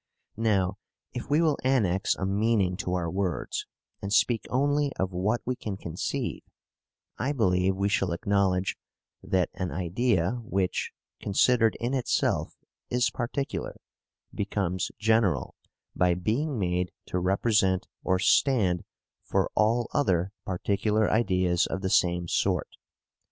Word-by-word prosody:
Now, 100 -3 +1 0.3
if 125 - -6
we 150 +3 +3
will 155 -3 +2
annex 105 -8 +2
a 95 - -3
meaning 100 -2 +1
to 90 -1 -2
our 85 -2 -1
words, 90 -3 -2 0.3
and 100 - -4
speak 115 +1 +2
only 145 +2 +1
of 95 0 -1
what 105 +7 0
we 125 - -1
can 105 -5 -5
conceive, 85 -3 -3 0.8
I 135 +4 0
believe 95 -6 +2
we 100 +1 0
shall 95 -3 +1
acknowledge 95 +1 +1 0.4
that 95 -2 0
an 90 -1 -3
idea 95 - 0
which, 95 -5 -1 0.3
considered 115 +2 +3
in 120 +3 -2
itself, 130 -3 0 0.3
is 125 0 +1
particular, 135 +3 -3 0.5
becomes 95 -3 -1
general 110 - +2 0.4
by 90 -1 +3
being 120 - -1
made 90 -2 -1
to 90 - -2
represent 95 +1 +2 0.2
or 95 - +2
stand 95 -4 +3 0.4
for - - 0
all 115 +2 +2
other 95 - +1 0.2
particular 105 +3 +1
ideas 90 -5 +2
of 95 - -4
the 95 -1 -1
same 85 -1 +2
sort. - - 0
100 Hz, 130 wpm, -27 LUFS, 90-115 Hz, 0.8 s, we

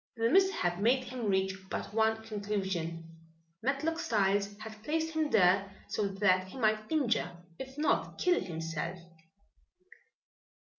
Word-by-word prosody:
The 230 +1 +2
mishap 370 - +3
made 250 +5 +3
him 250 -3 -4
reach 190 -1 +1 0.2
but - - -4
one 220 0 +2
conclusion. 190 -6 -3 0.6
Matlock 285 +6 0
Styles 205 -1 +1
had 215 0 -9
placed 320 +3 -1
him 315 -1 +1
there 195 -1 +4 0.2
so 210 -1 0
that 190 -1 +2
he 190 - -10
might 215 -1 +1
injure 230 - +1 0.2
if 265 +1 -8
not 305 - 0
kill 360 -1 +2
himself! 165 0 -4
215 Hz, 130 wpm, -31 LUFS, 190-255 Hz, 0.6 s, there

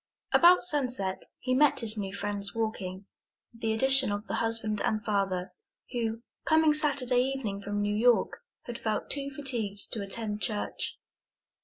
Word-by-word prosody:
About 355 +1 +7
sunset 255 - -1
he 255 - -1
met 275 0 +4
his 220 -1 0
new 200 -3 -3
friends 200 +1 -4
walking, 200 -4 -3 0.5
with 230 - -18
the 225 -2 +1
addition 265 +1 +4
of 205 +1 -3
the - - -5
husband 225 -2 -1
and 215 -1 0
father, 195 -3 -1 0.4
who, 230 -2 -2 0.2
coming 315 -1 +4
Saturday 275 -5 +2
evening 250 -7 -2
from 205 +1 -2
New 205 0 0
York, 240 +2 +3 0.3
had 240 -1 -6
felt 215 -1 -2
too 280 -1 -1
fatigued 240 -8 -3
to 220 - -2
attend 210 +1 -3
church. 205 +3 -2
225 Hz, 155 wpm, -29 LUFS, 205-260 Hz, 0.5 s, About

